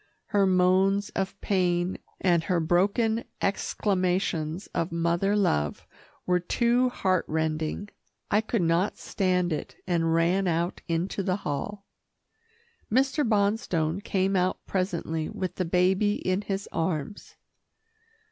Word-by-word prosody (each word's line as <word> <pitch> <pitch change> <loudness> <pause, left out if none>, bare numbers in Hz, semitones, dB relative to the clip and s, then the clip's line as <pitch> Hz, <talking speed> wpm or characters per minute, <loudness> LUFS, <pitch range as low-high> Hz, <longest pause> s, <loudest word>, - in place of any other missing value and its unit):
Her 200 -2 +3
moans 190 +2 +3
of 195 +1 -3
pain, 180 -2 0 0.2
and 170 -3 +2
her 180 -3 +1
broken 200 +7 +2 0.2
exclamations 180 -4 0
of 165 0 -1
mother 170 +4 +1
love 75 - 0 0.4
were 180 0 +2
too 240 +7 +2
heart 185 -7 +1
rending. 160 +4 -2 0.4
I 210 - +4
could 220 -3 -1
not 170 +4 +1
stand 180 -3 0
it, 150 - -5
and 165 -2 +1
ran 180 +3 +2
out 170 +1 -1
into 170 +4 -1
the 185 -1 0
hall. 195 +8 -4 1.1
Mr. 270 +5 +2
Bonstone 200 - +1
came 195 0 0
out 185 0 0
presently 170 -4 -2
with 185 -2 -4
the 185 - 0
baby 185 +4 +2
in 185 +2 -1
his 200 -1 -3
arms. 165 +3 -3
185 Hz, 120 wpm, -27 LUFS, 170-200 Hz, 1.1 s, I